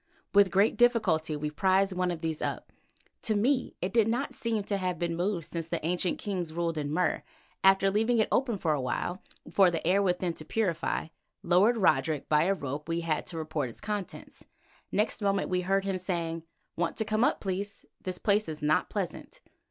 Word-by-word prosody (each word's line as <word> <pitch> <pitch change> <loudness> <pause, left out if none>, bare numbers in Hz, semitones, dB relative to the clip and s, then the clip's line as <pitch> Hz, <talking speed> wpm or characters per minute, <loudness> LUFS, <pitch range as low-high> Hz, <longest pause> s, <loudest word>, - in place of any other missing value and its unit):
With 200 -1 +6
great 200 +4 +3
difficulty 185 -11 +3
we 150 0 -3
prised 190 +4 +2
one 180 0 +1
of 170 -2 -4
these 160 -2 -2
up; - - -3 0.5
to 215 - +1
me 255 +6 +1
it 190 +2 -2
did 225 -2 +4
not 245 +5 -1
seem 225 -3 -1
to 200 0 -1
have 185 -2 -2
been 170 0 -1
moved 175 -1 -1
since 165 0 -5
the 165 -2 -3
ancient 180 +1 0
kings 180 -5 -3
ruled 170 0 -1
in 145 -1 -3
Mur 180 +3 +2
and, - - -9 0.4
after 195 0 +5
leaving 225 +4 +2
it 220 - +3
open 240 -4 +1
for 160 -4 +1
a 145 - -1
long - - -5
while 175 +9 -2 0.3
for 195 -2 +5
the 165 -2 -3
air 190 +4 +4
within 180 -2 0
to 155 - -9
purify, 170 -3 -1 0.3
lowered 190 +7 +4
Roderick 160 -6 +2
by 150 +1 +3
a 195 +2 +2
rope 145 0 -5
we 165 0 0
had 160 -3 -1
to 165 - -6
report 155 -4 -2
its 115 - -12
contents. 210 -3 -6 0.5
Next 215 +1 0
moment 200 -1 +1
we 180 0 +1
heard 195 +2 +1
him 190 -1 -1
saying: 170 -3 -3 0.3
"Want 170 0 -1
to 220 - 0
come 215 +2 +1
up, - - +2
please. 200 +1 -4 0.2
This 185 -1 -3
place 205 -1 +2
is 155 -1 -5
not 150 +1 +2
pleasant." - - -5
185 Hz, 205 wpm, -29 LUFS, 165-200 Hz, 0.5 s, With